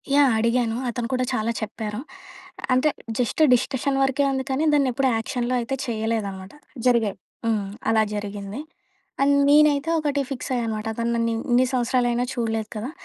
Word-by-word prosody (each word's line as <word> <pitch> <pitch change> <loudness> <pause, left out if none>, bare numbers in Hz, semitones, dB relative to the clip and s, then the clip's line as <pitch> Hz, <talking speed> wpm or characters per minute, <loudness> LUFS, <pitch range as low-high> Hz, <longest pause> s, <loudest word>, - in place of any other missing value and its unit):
Yeah! 280 -4 +5
అడిగాను. 230 0 +1
అతను 235 0 -3
కూడా 255 0 +1
చాలా 225 -1 0
చెప్పారు. 215 0 -4 0.7
అంటే 255 +4 +3 0.3
జస్ట్ 245 +5 0
డిస్కషన్ 270 +2 0
వరకే 270 +1 +1
ఉంది 265 0 -1
కానీ 265 +3 0
దాన్నెప్పుడు 270 -2 +2
ఆక్షన్‌లో 245 +1 -2
అయితే 260 +3 -2
చేయలేదనమాట. 215 -4 -3 0.3
జరిగాయి. 225 -5 +2 0.3
హ్మ్. 210 -3 0 0.2
అలా 220 -1 +4
జరిగింది 205 +4 -5 0.6
అండ్ 285 +1 +4
నేనైతే 295 +1 +5
ఒకటి 290 -2 0
ఫిక్స్ 270 +1 -5
అయ్యా 240 - 0
అనమాట. 215 -1 -3
అతను 235 +1 -1
నన్ను 230 0 +1 0.2
ఎన్ని 245 +1 +5
సంవత్సరాలయినా 245 -1 +1
చూడలేదు 225 -2 -2
కదా! 220 +5 -4
240 Hz, 145 wpm, -24 LUFS, 220-265 Hz, 0.7 s, Yeah